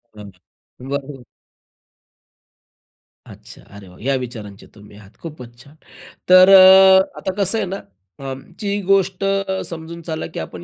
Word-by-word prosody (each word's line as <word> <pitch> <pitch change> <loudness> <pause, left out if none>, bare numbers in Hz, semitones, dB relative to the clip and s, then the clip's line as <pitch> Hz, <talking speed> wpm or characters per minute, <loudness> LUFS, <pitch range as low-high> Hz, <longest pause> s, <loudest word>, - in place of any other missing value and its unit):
अगदी 100 +5 -17
बरोबर. 140 -1 -6 2.0
अच्छा, - - -15
अरे 100 -1 -13
वाह! 90 0 -17
या 135 +4 -1
विचारांचे 110 -6 -8
तुम्ही 105 -1 -17
आहात, 100 -2 -17
खूपच 125 -8 -11
छान! 145 +2 -20 0.5
तर 185 +1 +7
अ, 190 0 +6
आता 190 - -5
कसं 195 +3 0
आहे - - -2
ना, 190 +2 -5 0.4
अं, 135 -1 -7 0.2
जी 205 0 -3
गोष्ट 195 -1 0 0.5
समजून 170 0 -9
चला 160 -1 -5
की - - -9
आपण 85 +2 -9
145 Hz, 135 wpm, -18 LUFS, -, 2.0 s, तर